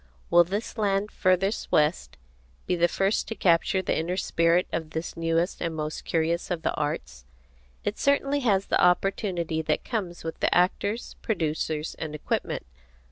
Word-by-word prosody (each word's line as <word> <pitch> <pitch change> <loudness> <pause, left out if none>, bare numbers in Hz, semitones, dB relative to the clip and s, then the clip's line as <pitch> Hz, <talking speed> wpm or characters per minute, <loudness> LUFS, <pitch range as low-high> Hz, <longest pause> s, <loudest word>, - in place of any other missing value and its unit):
Will 175 0 +8
this 205 +6 -4
land 205 0 +1
furthest 185 +3 +1
west 150 +3 +1 0.5
be 180 - +1
the 175 0 +3
first 195 +4 0
to 225 - -4
capture 185 +1 +2
the - - 0
inner 175 +3 -1
spirit 170 -1 +2
of 160 -1 -2
this 160 +1 -5
newest 165 +2 0
and 165 -2 -2
most 155 0 -4
curious 165 +1 0
of 175 -3 -2
the - - +1
arts? 145 - -3 0.6
It 205 - -2
certainly 280 0 +2
has 200 -7 +2
the - - +1
opportunity 180 -3 +1
that 155 -1 -1
comes 190 -8 -3
with 165 0 -5
the - - +2
actors, 200 +5 0
producers, 155 -5 -1
and 155 -1 -4
equipment. 150 - -2
175 Hz, 160 wpm, -26 LUFS, 160-195 Hz, 0.6 s, Will